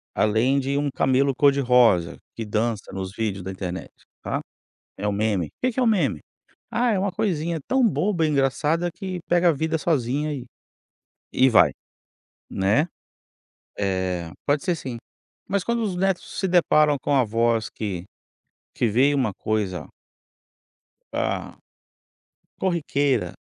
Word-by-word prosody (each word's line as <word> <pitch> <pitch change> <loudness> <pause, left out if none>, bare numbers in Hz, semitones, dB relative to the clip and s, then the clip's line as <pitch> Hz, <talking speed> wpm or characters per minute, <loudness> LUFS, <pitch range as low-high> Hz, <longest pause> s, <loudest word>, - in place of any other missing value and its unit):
além 115 +6 +2
de 140 +1 -1
um 145 0 0
camelo 135 +2 +2
cor-de-rosa 125 -11 +4 0.2
que 115 - -4
dança 110 0 -2
nos 95 -1 -4
vídeos 100 -4 -2
da 95 - -5
internet, 95 -1 -6 0.3
tá. - - -2 0.6
É 100 - -4
um - - 0
meme, 100 -4 0
o - - -22 0.2
que 255 - +1
que 260 - -1
é - - +3
um - - +2
meme? 170 - +2 0.5
Ah, 240 0 +2
é 210 - +1
uma 195 +1 0
coisinha 170 -4 -1
tão 260 -2 +3
boba, 190 -5 +1
engraçada, 150 +4 +1
que 185 0 -5
pega 175 0 +4
a - - +6
vida 160 +2 -1
sozinha, 150 -1 0
eh, 135 -4 -5 0.9
e 130 +1 +5
vai 115 - +6 0.8
né 105 - +2 0.9
eh, 95 -4 -1
pode 145 0 +1
ser 175 - +1
sim. 130 -6 -6 0.5
Mas 200 -1 0
quando 235 +3 0
os 200 -4 -2
netos 190 0 -1
se 190 - 0
deparam 155 -4 +4
com 145 - +1
avós 115 -2 +2
que, 95 -5 -4 0.7
que 120 - +1
veem 130 +7 +3
uma 125 -7 0
coisa 100 -3 -2 1.3
ah, - - -2 1.0
corriqueira. 145 - 0
135 Hz, 145 wpm, -24 LUFS, 110-170 Hz, 1.3 s, a